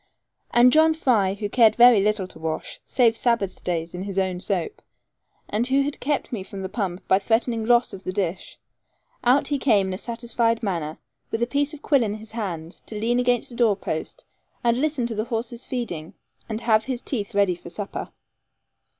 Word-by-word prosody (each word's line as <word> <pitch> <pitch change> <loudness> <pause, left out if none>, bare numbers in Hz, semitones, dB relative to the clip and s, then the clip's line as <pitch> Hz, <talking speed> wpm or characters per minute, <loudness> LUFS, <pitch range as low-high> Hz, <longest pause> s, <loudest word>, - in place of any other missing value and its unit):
And 245 +1 +5
John 315 +1 +5
Fry, 215 - +2
who 205 0 -3
cared 225 +1 +4
very 240 -3 +7
little 210 -1 +1
to 160 - -13
wash, 160 0 -4
save 235 -4 +3
Sabbath 230 -5 0
days 165 -2 -2
in 180 - -5
his 195 0 -5
own 185 -2 0
soap, 185 -3 -2 0.7
and 220 +4 0
who 270 +1 +3
had 285 +1 -4
kept 290 0 -1
me 215 - -2
from 195 0 -7
the 190 - -4
pump 190 -4 -4
by 190 - +4
threatening 225 +2 0
loss 240 0 +4
of 190 - -9
the - - -3
dish, 185 -2 -3 0.7
out 255 +4 +3
he 285 -1 0
came 210 -8 +3
in - - -3
a 185 - -5
satisfied 235 -1 -1
manner, 165 -6 -2 0.3
with 225 +1 -1
a - - +3
piece 285 +3 0
of 300 - -15
quill 280 -3 +3
in 210 -2 -1
his 220 0 -11
hand, 180 -7 -5
to 215 - -5
lean 240 +3 +1
against 245 0 +1
a - - -9
door 230 -4 +3
post, 195 - -5 0.4
and 240 +1 +2
listen 300 -5 0
to 235 - -3
the 215 0 -2
horses 235 0 -4
feeding, 180 -11 -4 0.3
and 220 +1 -3
have 220 -2 +3
his 255 -2 -3
teeth 215 -4 -3
ready 200 -2 +3
for 175 0 -10
supper. 205 +3 -5
225 Hz, 200 wpm, -24 LUFS, 195-245 Hz, 0.7 s, very